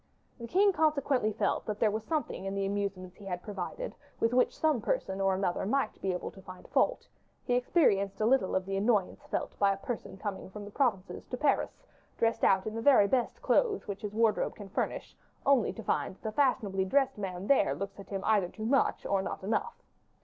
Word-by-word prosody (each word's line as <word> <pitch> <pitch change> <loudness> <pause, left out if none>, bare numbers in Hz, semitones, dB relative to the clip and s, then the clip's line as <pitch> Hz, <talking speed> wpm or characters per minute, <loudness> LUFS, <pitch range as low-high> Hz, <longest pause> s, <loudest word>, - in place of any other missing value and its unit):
The 235 - -6
king 390 - +4
consequently 280 -8 +2
felt - - -1
that 210 -1 -3
there 215 - +3
was 215 +1 -3
something 305 -11 -2
in 195 0 -3
the 195 0 0
amusements 195 -2 -3
he 205 - -12
had 180 -2 -4
provided 205 - -5 0.3
with 230 +1 +1
which 250 - +2
some 310 -7 +2
person 190 -1 -1
or 195 -1 +2
another 185 -2 -1
might 270 0 -1
be 190 - 0
able 180 - -4
to 195 - -14
find 185 -1 -11
fault; - - +1 0.4
he 245 - 0
experienced 245 - +2
a 215 - +2
little 250 -4 +3
of 190 0 0
the 195 0 -3
annoyance 205 -2 0
felt - - -3
by 200 -1 +4
a 195 - -2
person 205 -4 -6
coming 195 -2 -5
from 205 +1 -8
the 205 - -10
provinces 205 -7 -1
to 250 - -4
Paris, 290 - 0 0.3
dressed 230 0 +1
out 190 -1 +4
in 215 - -3
the 225 - -3
very 250 -6 +6
best 250 +1 -1
clothes 440 -5 +2
which 200 -1 -5
his 210 0 -5
wardrobe 225 -1 +2
can 205 -2 -10
furnish, - - -3 0.3
only 275 -4 +4
to 225 - -9
find - - -1
that - - -30
the 220 - -2
fashionably 215 -7 +1
dressed 270 +4 +1
man 185 -1 -4
there 275 +5 +3
looks 200 +1 -6
at 200 - -11
him 195 -1 -4
either 205 -5 +3
too 215 - -7
much 270 +4 +2
or 195 -1 +1
not 190 - -5
enough. 230 - -2
210 Hz, 215 wpm, -30 LUFS, 195-250 Hz, 0.4 s, very